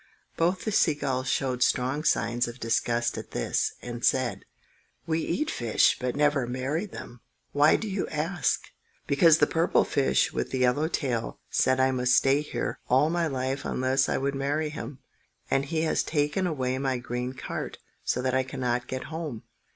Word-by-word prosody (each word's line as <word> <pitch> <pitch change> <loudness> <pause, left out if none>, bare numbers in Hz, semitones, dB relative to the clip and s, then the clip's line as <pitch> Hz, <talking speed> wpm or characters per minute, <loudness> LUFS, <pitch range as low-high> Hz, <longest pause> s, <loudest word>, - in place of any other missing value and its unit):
Both 180 +3 0
the 215 - 0
sea 160 -6 +3
gulls 135 -2 -2
showed 130 -1 0
strong 130 +4 +1
signs 120 -2 +1
of 120 +1 -8
disgust 120 +1 0
at - - -9
this, - - -1
and 120 -1 -6
said,— 130 -2 +1 0.6
"We 165 -1 0
eat 300 - -1
fish, 115 -3 +3
but 125 -1 -2
never 145 -3 +2
marry 135 - -2
them. 120 - -10 0.3
Why 145 +2 +5
do 220 - -3
you 195 -1 -2
ask?" 160 +2 0 0.4
"Because 155 +3 +5
the - - +5
purple 165 +1 +2
fish 140 - +1
with - - -2
the 130 - -2
yellow 125 +5 +2
tail 120 - -2
said 130 0 +2
I 130 0 +4
must 125 0 +2
stay 135 +2 +4
here 150 - -4
all 135 +5 +4
my 170 -1 +1
life 135 -1 -2
unless 130 +1 +1
I - - +1
would 140 +1 -1
marry 145 +3 -1
him. 150 -2 -7 0.5
And 135 0 +2
he 160 +2 -1
has 160 - +1
taken 150 +5 0
away 130 -5 -1
my 135 -2 0
green 125 +1 -4
cart, 130 - -5 0.3
so 125 - -1
that 130 -1 0
I 130 - +3
cannot 125 -2 -2
get 130 0 -4
home." 155 -9 -5
135 Hz, 180 wpm, -27 LUFS, 125-150 Hz, 0.6 s, Why